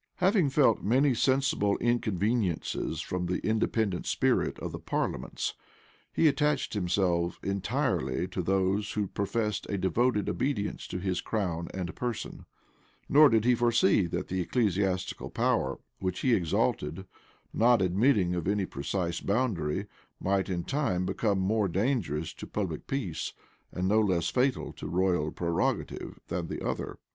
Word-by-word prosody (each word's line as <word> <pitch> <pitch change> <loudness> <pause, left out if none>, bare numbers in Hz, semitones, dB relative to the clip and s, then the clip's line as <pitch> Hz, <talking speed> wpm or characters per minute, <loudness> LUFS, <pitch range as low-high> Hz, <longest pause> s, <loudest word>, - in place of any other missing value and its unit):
Having 185 -4 +3
felt 135 -5 +3
many 130 +6 +3
sensible 130 -5 +2
inconveniencies 110 -5 0
from 90 -1 -3
the 90 - 0
independent 110 -3 0
spirit - - +1
of - - -5
parliaments, 60 - -2 0.6
he 165 - +3
attached 145 0 +1
himself 90 -3 0
entirely 95 -2 -1
to 95 - -2
those 95 +3 0
who 105 -1 0
professed 100 +1 -2
a 100 - -1
devoted 105 +3 +1
obedience 115 -7 -2
to - - -4
his 90 -1 -1
crown 85 -6 -2
and 90 -2 -5
person; 120 -3 -4 0.6
nor 150 +1 +7
did 110 -1 +2
he 125 - +5
foresee, 120 -6 +3
that 85 - -3
the 95 0 -1
ecclesiastical 95 -3 0
power - - 0 0.2
which 95 -1 -2
he 130 - +3
exalted, 85 -2 0 0.5
not 120 +1 +4
admitting 95 +1 +3
of 90 -2 -2
any 100 -1 +1
precise 85 +4 -3
boundary, 100 -9 0 0.3
might 95 0 0
in 85 -2 -1
time 130 - 0
become 100 +1 0
more 100 +2 +1
dangerous 85 - -1
to - - -9
public - - -3
peace, 125 - -3 0.4
and 90 +1 -2
no 105 +3 +4
less 90 -5 +1
fatal 130 +1 0
to - - -7
royal 90 -2 +1
prerogative, 85 -1 -2
than 85 -1 -3
the - - -5
other. - - -3
100 Hz, 140 wpm, -29 LUFS, 90-120 Hz, 0.6 s, nor